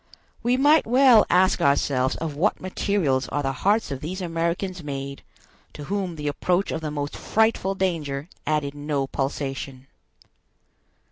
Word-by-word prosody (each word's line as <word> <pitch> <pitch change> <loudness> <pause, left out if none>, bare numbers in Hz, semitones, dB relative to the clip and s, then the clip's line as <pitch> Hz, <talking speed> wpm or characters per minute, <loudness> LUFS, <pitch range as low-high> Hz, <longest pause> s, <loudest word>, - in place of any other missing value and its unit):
We 245 +2 +2
might 295 +2 +4
well 250 -2 +6
ask 185 0 +3
ourselves 140 -3 +2
of 160 -3 -4
what 190 +9 +1
materials 185 -8 0
are 145 - -2
the 135 - 0
hearts 200 - +1
of 135 -1 -4
these 180 +5 -5
Americans 175 +1 -2
made, 140 -1 -5 0.5
to 150 - -8
whom 190 0 -3
the 150 -1 -5
approach 180 +6 0
of 160 - -3
the 155 - -3
most 145 -1 -4
frightful 220 -3 +1
danger 155 -7 -2 0.2
added 150 -2 0
no 145 -1 -2
pulsation. 135 -1 -4
160 Hz, 145 wpm, -24 LUFS, 140-190 Hz, 0.5 s, well